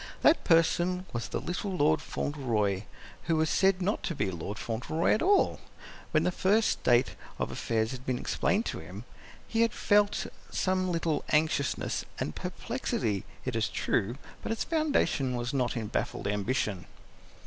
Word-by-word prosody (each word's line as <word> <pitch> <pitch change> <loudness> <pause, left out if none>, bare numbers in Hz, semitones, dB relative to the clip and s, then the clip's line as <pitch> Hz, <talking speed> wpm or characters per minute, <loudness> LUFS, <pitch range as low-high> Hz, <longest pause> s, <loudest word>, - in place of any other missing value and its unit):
That 320 - +5
person 175 +2 +3
was 120 0 -2
the - - -3
little 180 +2 -3
Lord 155 +1 +3
Fauntleroy 110 -11 -1 0.4
who 165 - +2
was 155 0 +2
said 190 -1 +3
not 205 +4 0
to 170 - -3
be 100 -8 0
Lord 95 +4 -5
Fauntleroy 125 +8 0
at - - +1
all. 395 +2 +3 0.5
When 155 0 +2
first 205 +5 +2
the - - +2
state 120 +2 +3 0.2
of - - -2
affairs 110 -1 -1
had 130 -1 -7
been 130 -1 -1
explained 205 - 0
to - - -3
him, 90 +8 -9 0.4
he 225 - +1
had 230 -1 +3
felt 205 0 +3 0.2
some 185 -1 0
little 165 -2 0
anxiousness 150 -3 +1 0.2
and - - -2
perplexity, 100 -3 -2 0.2
it - - -2
is - - +1
true, 115 +6 0 0.2
but - - -3
its 225 - -1
foundation 290 - +1
was 120 +2 -3
not 125 -3 0
in 115 - -2
baffled - - -2
ambition. 105 -2 -1
150 Hz, 160 wpm, -29 LUFS, 115-185 Hz, 0.5 s, That